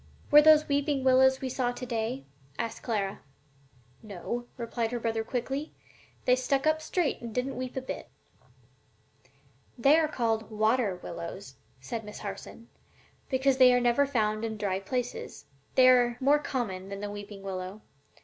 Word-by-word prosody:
'" -, -, -27 dB
"Were 295 Hz, +1 st, +10 dB
those 305 Hz, 0 st, +6 dB
weeping 285 Hz, -1 st, 0 dB
willows 260 Hz, 0 st, +6 dB
that -, -, -17 dB
we 260 Hz, -, -1 dB
saw 250 Hz, -1 st, 0 dB
to 250 Hz, -, -6 dB
day?" 220 Hz, -, -3 dB, 0.3 s
asked 230 Hz, -, -4 dB
Clara. 200 Hz, -5 st, -2 dB, 0.8 s
"No," 225 Hz, +4 st, -5 dB
replied 235 Hz, -1 st, -2 dB
her 240 Hz, -, -2 dB
brother, 225 Hz, -1 st, -1 dB
quickly; 270 Hz, +6 st, -4 dB, 0.5 s
"they 250 Hz, -, +5 dB
just 255 Hz, 0 st, 0 dB
stuck 275 Hz, +1 st, +1 dB
up 310 Hz, 0 st, +2 dB
straight 320 Hz, -1 st, -1 dB
and 230 Hz, -2 st, -7 dB
didn't 255 Hz, +2 st, -1 dB
weep 255 Hz, 0 st, -5 dB
a -, -, -1 dB
bit." -, -, -6 dB, 1.7 s
"They 275 Hz, +6 st, +5 dB
are 315 Hz, -, +2 dB
called 225 Hz, -6 st, -1 dB
water 215 Hz, -1 st, +1 dB
willows," 170 Hz, -2 st, -7 dB, 0.3 s
said 225 Hz, -, -5 dB
Miss 210 Hz, 0 st, -9 dB
Harson, 215 Hz, +3 st, -8 dB, 0.6 s
"because 265 Hz, 0 st, +2 dB
they 255 Hz, -1 st, +7 dB
are -, -, +4 dB
never 245 Hz, +3 st, +3 dB
found 215 Hz, -5 st, 0 dB
in 220 Hz, -1 st, -3 dB
dry 195 Hz, -2 st, -1 dB
places. 245 Hz, +5 st, -4 dB, 0.3 s
They 255 Hz, -1 st, +7 dB
are 245 Hz, -2 st, +5 dB
more 285 Hz, +3 st, +4 dB
common 195 Hz, -10 st, -4 dB
than 200 Hz, 0 st, -6 dB
the 205 Hz, 0 st, -4 dB
weeping 205 Hz, -1 st, -9 dB
willow. 190 Hz, +1 st, -5 dB
240 Hz, 170 wpm, -29 LUFS, 215-265 Hz, 1.7 s, Were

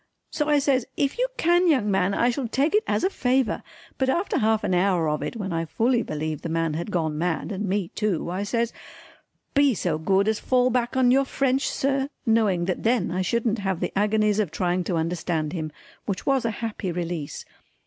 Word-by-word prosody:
So 300 Hz, -1 st, -1 dB
I 295 Hz, -, +5 dB
says 270 Hz, -3 st, +1 dB
"If 280 Hz, -, 0 dB
you -, -, +2 dB
can 350 Hz, +2 st, +3 dB
young 255 Hz, -11 st, +3 dB
man 195 Hz, 0 st, +1 dB
I 240 Hz, -, +3 dB
shall 250 Hz, 0 st, -3 dB
take 275 Hz, -, +1 dB
it 425 Hz, -, +4 dB
as -, -, 0 dB
a 375 Hz, -, +3 dB
favour," 255 Hz, -, +1 dB, 0.4 s
but 265 Hz, -1 st, +2 dB
after 345 Hz, +8 st, 0 dB
half 220 Hz, 0 st, +2 dB
an -, -, 0 dB
hour 180 Hz, -2 st, +2 dB
of 150 Hz, 0 st, -1 dB
it -, -, -4 dB
when 195 Hz, -5 st, -4 dB
I 165 Hz, 0 st, -1 dB
fully 235 Hz, +8 st, +1 dB
believed 155 Hz, -3 st, -4 dB
the 170 Hz, -, -4 dB
man 165 Hz, -1 st, 0 dB
had 170 Hz, +6 st, -4 dB
gone 160 Hz, -5 st, -1 dB
mad 175 Hz, +2 st, -1 dB
and 200 Hz, +1 st, -3 dB
me 190 Hz, -2 st, -1 dB
too 195 Hz, -5 st, -2 dB
I 185 Hz, +2 st, -2 dB
says 230 Hz, +3 st, -1 dB, 0.8 s
"Be 280 Hz, -4 st, +4 dB
so 165 Hz, -5 st, -1 dB
good 195 Hz, +5 st, +2 dB
as 220 Hz, -1 st, +1 dB
fall 255 Hz, -1 st, +2 dB
back 245 Hz, +1 st, 0 dB
on 250 Hz, -1 st, +4 dB
your 270 Hz, +1 st, +4 dB
French 270 Hz, 0 st, 0 dB
sir," 275 Hz, 0 st, 0 dB, 0.2 s
knowing 215 Hz, -7 st, +2 dB
that 185 Hz, -1 st, -2 dB
then 230 Hz, -5 st, +1 dB
I 185 Hz, +2 st, -1 dB
shouldn't 225 Hz, +3 st, 0 dB
have 190 Hz, -3 st, -1 dB
the -, -, -3 dB
agonies 210 Hz, +1 st, +2 dB
of 205 Hz, -6 st, +1 dB
trying 180 Hz, +2 st, 0 dB
to 180 Hz, -, -1 dB
understand 160 Hz, -1 st, -1 dB
him, 160 Hz, -3 st, -4 dB, 0.4 s
which 195 Hz, -3 st, -3 dB
was 270 Hz, -3 st, +2 dB
a -, -, +2 dB, 0.2 s
happy 210 Hz, -4 st, -3 dB
release. 170 Hz, -3 st, -4 dB
210 Hz, 215 wpm, -25 LUFS, 175-255 Hz, 0.8 s, I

